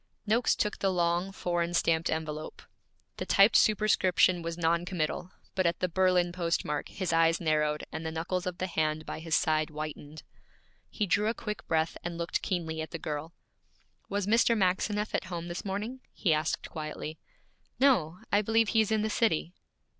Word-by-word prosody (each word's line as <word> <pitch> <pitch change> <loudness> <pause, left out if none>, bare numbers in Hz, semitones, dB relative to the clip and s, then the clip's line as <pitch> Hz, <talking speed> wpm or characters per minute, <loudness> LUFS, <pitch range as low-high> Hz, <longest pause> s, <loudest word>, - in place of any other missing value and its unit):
Noakes 225 +3 +2
took 210 - -1
the 195 - +1
long, 175 +1 +1
foreign 175 -2 -1
stamped 165 -1 +2
envelope. 155 -1 -4 0.5
The - - -3
typed 200 +3 +5
superscription 190 -4 +4
was 165 0 -4
noncommittal, 170 0 -1 0.2
but 185 -2 +2
at 170 - 0
the 185 - +1
Berlin 180 0 +2
postmark 165 -4 -1
his 185 -4 -3
eyes 165 0 +4
narrowed 150 -2 +1
and 160 - -5
the 160 - -2
knuckles 175 +3 -2
of 180 -1 -3
the 185 - -2
hand 155 -3 -1
by - - -5
his 160 0 0
side 155 -1 +2
whitened. 155 0 -7 0.7
He 210 - -1
drew 205 +3 +2
a 225 - 0
quick 210 -1 -6
breath 160 0 0
and 170 -1 -4
looked 170 0 -2
keenly 160 -3 -2
at 160 - -5
the - - -5
girl. 155 +2 -5 0.7
'Was 200 -1 -1
Mr. 230 +2 +3
Maxineff 205 +2 0
at - - 0
home 175 -2 -5
this 175 - -5
morning?' 210 +6 -4
he 170 -6 +1
asked 155 0 -1
quietly. 155 0 -6 0.6
'No; 185 - +3
I 205 - +4
believe 225 +1 +2
he 225 - +4
is 220 0 -1
in 215 -1 +2
the 220 - 0
city.' 175 -6 +1
175 Hz, 175 wpm, -29 LUFS, 160-195 Hz, 0.7 s, typed